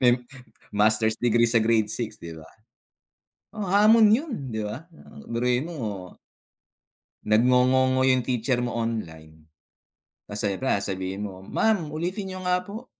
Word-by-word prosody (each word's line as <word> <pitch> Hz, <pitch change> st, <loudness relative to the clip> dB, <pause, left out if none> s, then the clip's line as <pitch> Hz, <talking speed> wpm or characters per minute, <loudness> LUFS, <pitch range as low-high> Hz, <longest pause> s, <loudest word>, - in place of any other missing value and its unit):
Tem 125 Hz, -1 st, +3 dB, 0.5 s
master's 110 Hz, +1 st, +2 dB
degree 120 Hz, -1 st, +3 dB
sa 115 Hz, 0 st, +3 dB
grade 110 Hz, -1 st, +1 dB
6, 110 Hz, -3 st, -4 dB
'di 85 Hz, -1 st, -9 dB
ba? 80 Hz, -, -15 dB, 1.1 s
Oh, 215 Hz, -, -4 dB
hamon 210 Hz, +3 st, +5 dB
yun 280 Hz, +6 st, +1 dB, 0.2 s
'di 110 Hz, -, -3 dB
ba? 150 Hz, +12 st, -8 dB, 0.4 s
Biruin 125 Hz, +6 st, 0 dB
mo, 105 Hz, -, -6 dB, 1.1 s
nag-ngongongo 125 Hz, +3 st, +3 dB
yung 130 Hz, -1 st, +2 dB
teacher 125 Hz, 0 st, -1 dB
mo 120 Hz, -1 st, -3 dB
online, 80 Hz, -9 st, -6 dB, 0.8 s
masaya 105 Hz, -1 st, -2 dB
pa, 130 Hz, -6 st, 0 dB
sabihin 95 Hz, 0 st, -4 dB
mo, 95 Hz, 0 st, -13 dB
"Ma'am, 185 Hz, -9 st, 0 dB
ulitin 180 Hz, +5 st, -3 dB
niyo 185 Hz, -1 st, -6 dB
nga 180 Hz, 0 st, +1 dB
po." 220 Hz, +5 st, -8 dB
120 Hz, 135 wpm, -25 LUFS, 105-155 Hz, 1.1 s, hamon